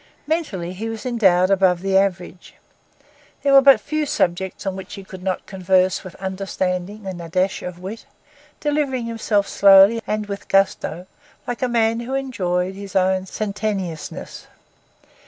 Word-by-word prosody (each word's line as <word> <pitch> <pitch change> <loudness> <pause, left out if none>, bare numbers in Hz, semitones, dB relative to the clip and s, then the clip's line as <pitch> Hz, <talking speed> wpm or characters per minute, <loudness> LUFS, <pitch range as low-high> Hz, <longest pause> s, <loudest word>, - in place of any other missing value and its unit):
Mentally, 250 - -2
he 220 +5 -5
was 225 +2 -6
endowed 190 -7 +3
above 185 -2 +3
the 195 0 0
average. 185 -2 -1 0.9
There 280 -1 +3
were 275 - +9
but 275 0 +7
few 305 0 -2
subjects 185 -4 -1
on 190 -1 -2
which 190 - -8
he 195 - -9
could 190 -1 -11
not 185 0 -3
converse 185 -1 +1
with 185 - -10
understanding 190 +1 -3
and 185 -2 -5
a 165 - -8
dash 185 +3 0
of 180 -1 -6
wit; 200 +8 -8 0.5
delivering 290 -5 -1
himself 225 -3 0
slowly 200 +3 +6
and 215 0 -1
with 200 -1 -7
gusto 190 -3 +1 0.4
like 245 -1 -4
a 255 - +2
man 230 -1 +1
who 245 +3 -4
enjoyed 185 -9 -1
his 195 0 -9
own 190 0 +2
sententiousness. 200 -5 -4
195 Hz, 155 wpm, -21 LUFS, 185-225 Hz, 0.9 s, were